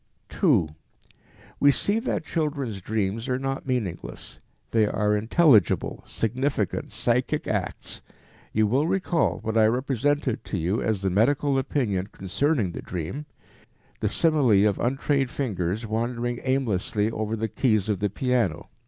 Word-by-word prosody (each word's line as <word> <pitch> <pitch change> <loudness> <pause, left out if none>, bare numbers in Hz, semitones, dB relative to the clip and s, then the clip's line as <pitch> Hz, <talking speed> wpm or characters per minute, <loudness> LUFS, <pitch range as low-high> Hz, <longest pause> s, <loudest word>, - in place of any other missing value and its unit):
2. 130 - +3 0.9
We 145 - +6
see 205 +9 +2
that 230 -9 -2
children's 140 - -2
dreams 110 +4 -2
are 125 - +1
not 135 +1 -3
meaningless; 110 -10 -4 0.3
they 110 -2 +3
are 105 0 +1
intelligible, 110 - +3
significant, 120 - -1
psychic - - 0
acts. - - -3 0.5
You 110 0 +2
will 130 +9 +2
recall 180 -3 0
what 110 0 +1
I 110 - +6
represented 130 +2 0
to 100 - -3
you 90 +6 0
as 105 -3 -1
the 95 - +1
medical 135 +7 +2
opinion 105 -9 -1
concerning 110 - -1
the - - -6
dream, 95 - -5 0.7
the 105 - 0
simile 130 - +3
of 100 - -1
untrained 135 +1 +1
fingers 105 -5 -2
wandering 120 +2 -2
aimlessly 110 -5 0
over 110 0 -2
the 110 0 -2
keys 110 -4 +1
of 105 -4 0
the 105 0 0
piano. 120 - -1
115 Hz, 135 wpm, -25 LUFS, 105-135 Hz, 0.9 s, We